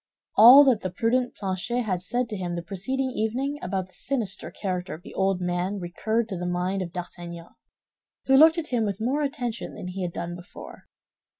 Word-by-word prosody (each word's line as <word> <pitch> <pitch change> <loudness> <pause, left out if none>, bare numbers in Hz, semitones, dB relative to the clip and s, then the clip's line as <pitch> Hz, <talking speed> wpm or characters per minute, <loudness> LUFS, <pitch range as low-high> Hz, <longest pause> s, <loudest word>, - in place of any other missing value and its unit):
All 245 +7 +10
that 255 -6 +3
the 185 - -2
prudent 240 +6 0
Planchet 200 +5 -2
had 185 -5 -2
said 240 +6 -1
to 215 - -4
him 180 -3 -3
the 170 - -4
preceding 260 +10 -2
evening 255 +6 -2
about 190 -1 -2
the 185 - -24
sinister 225 -1 -3
character 185 -3 -4
of 165 - -15
the - - -11
old 190 -1 +1
man 180 +2 -1
recurred 220 +6 -1
to 190 - -3
the 180 0 -3
mind 180 +2 -1
of 175 -2 -4
D'Artagnan, 175 -1 -7 0.8
who 270 - +4
looked 320 +4 +7
at 320 -2 -3
him 240 -3 +1
with 200 -3 -2
more 260 +7 0
attention 255 -5 -3
than 180 - -6
he 190 +1 -5
had 175 -1 -2
done 170 +1 -5
before. 175 0 -12
195 Hz, 200 wpm, -26 LUFS, 180-245 Hz, 0.8 s, All